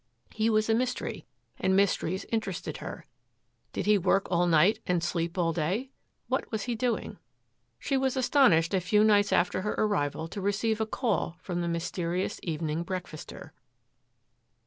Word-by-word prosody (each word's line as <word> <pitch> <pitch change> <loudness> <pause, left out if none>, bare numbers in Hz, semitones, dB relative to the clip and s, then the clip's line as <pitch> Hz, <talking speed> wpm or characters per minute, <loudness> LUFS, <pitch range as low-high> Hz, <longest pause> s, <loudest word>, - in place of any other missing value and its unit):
He 220 +1 +1
was 215 -1 +2
a 225 - +3
mystery 250 +2 -2 0.3
and 190 - +2
mysteries 190 -2 +1
interested 215 -5 -2
her. - - -8 0.7
Did - - -3
he 210 0 +4
work 195 +2 +2
all 175 0 +3
night 175 +5 +4
and 175 -2 +1
sleep 170 0 -2
all 165 -2 +1
day? 185 - -1 0.4
What - - -2
was 220 -3 -2
he 245 - -2
doing? 240 +1 -2 0.6
She 275 - -1
was 265 0 0
astonished 240 - +4
a 190 - +2
few 210 +4 +3
nights 205 -1 +4
after 180 - +2
her 210 - -2
arrival 160 -7 0
to 200 - -6
receive 210 +3 0
a 220 - 0
call 225 -7 -1
from 175 -2 -3
the 170 - -1
mysterious 170 +1 -2
evening 160 -1 -2
breakfaster. 175 -3 -7
190 Hz, 160 wpm, -28 LUFS, 170-220 Hz, 0.7 s, he